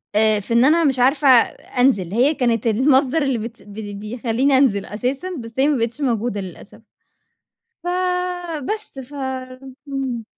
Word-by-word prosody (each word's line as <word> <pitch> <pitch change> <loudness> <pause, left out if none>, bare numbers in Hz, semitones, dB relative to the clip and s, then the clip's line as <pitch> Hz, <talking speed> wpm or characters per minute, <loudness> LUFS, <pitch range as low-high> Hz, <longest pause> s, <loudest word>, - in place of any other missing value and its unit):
آآ، 215 0 +3
في 205 +3 -5
إن 235 +2 +5
أنا 330 +4 +4
مش 270 -4 +1
عارفة 275 +3 +3 0.5
أنزل، 200 -9 +2
هي 255 +7 +3
كانت 235 -5 0
المصدر 265 +6 +3
اللي 270 -3 0
بت 230 +1 -7
ب 205 0 -13 0.3
بيخلّيني 240 +5 0
أنزل 220 -8 +2
أساسًا 255 - -3
بس 230 -1 -8
هي 270 +2 +3
ما 295 -2 +2
بقتش 230 +4 -2
موجودة 235 -5 -1
للأسف. 190 +4 -11 1.0
ف - - -11 0.9
بس 425 -10 -10
ف 265 +2 -9 0.7
امم. 265 -4 -3
245 Hz, 150 wpm, -20 LUFS, 225-275 Hz, 1.0 s, إن